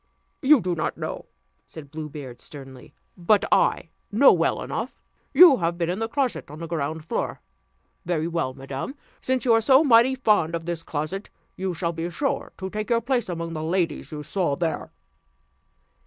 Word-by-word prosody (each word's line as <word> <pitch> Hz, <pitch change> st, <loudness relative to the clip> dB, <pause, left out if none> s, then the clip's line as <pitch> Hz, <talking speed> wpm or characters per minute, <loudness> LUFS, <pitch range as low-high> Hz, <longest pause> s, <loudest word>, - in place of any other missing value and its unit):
"You 285 Hz, -1 st, +6 dB
do 180 Hz, -1 st, -1 dB
not 160 Hz, -, -2 dB
know?" -, -, -5 dB, 0.4 s
said 145 Hz, -3 st, -11 dB
Blue 155 Hz, -1 st, -6 dB
Beard 130 Hz, -5 st, -9 dB
sternly, 135 Hz, -3 st, -12 dB, 0.2 s
"but 200 Hz, +3 st, +2 dB
I -, -, +2 dB, 0.2 s
know -, -, +7 dB
well -, -, 0 dB
enough. -, -, -5 dB, 0.3 s
You 300 Hz, -1 st, +8 dB
have 170 Hz, -1 st, -1 dB
been 170 Hz, 0 st, 0 dB
in 185 Hz, -, -3 dB
the 225 Hz, -, -1 dB
closet 260 Hz, -, -2 dB
on 150 Hz, -, -9 dB
the 165 Hz, -, -6 dB
ground 160 Hz, -1 st, -3 dB
floor! -, -, -3 dB, 0.6 s
Very 165 Hz, -2 st, -1 dB
well, 165 Hz, -6 st, -2 dB
madam: 135 Hz, -, -6 dB, 0.3 s
since 260 Hz, 0 st, -1 dB
you 235 Hz, -, +5 dB
are 225 Hz, -, +4 dB
so 265 Hz, +5 st, +5 dB
mighty 255 Hz, -1 st, +5 dB
fond 210 Hz, -10 st, +2 dB
of 165 Hz, -1 st, -5 dB
this 170 Hz, -1 st, -3 dB
closet, 165 Hz, +7 st, -4 dB, 0.3 s
you 185 Hz, -1 st, -3 dB
shall 170 Hz, 0 st, -1 dB
be 165 Hz, +1 st, -3 dB
sure 275 Hz, +11 st, -2 dB
to 190 Hz, 0 st, -5 dB
take 215 Hz, +2 st, -4 dB
your 230 Hz, -1 st, +2 dB
place 245 Hz, -3 st, -1 dB
among 170 Hz, -1 st, -4 dB
the 155 Hz, -, -4 dB
ladies 170 Hz, +1 st, -1 dB
you 150 Hz, -1 st, -6 dB
saw 160 Hz, -1 st, 0 dB
there." 160 Hz, 0 st, -3 dB
170 Hz, 185 wpm, -24 LUFS, 155-225 Hz, 0.6 s, You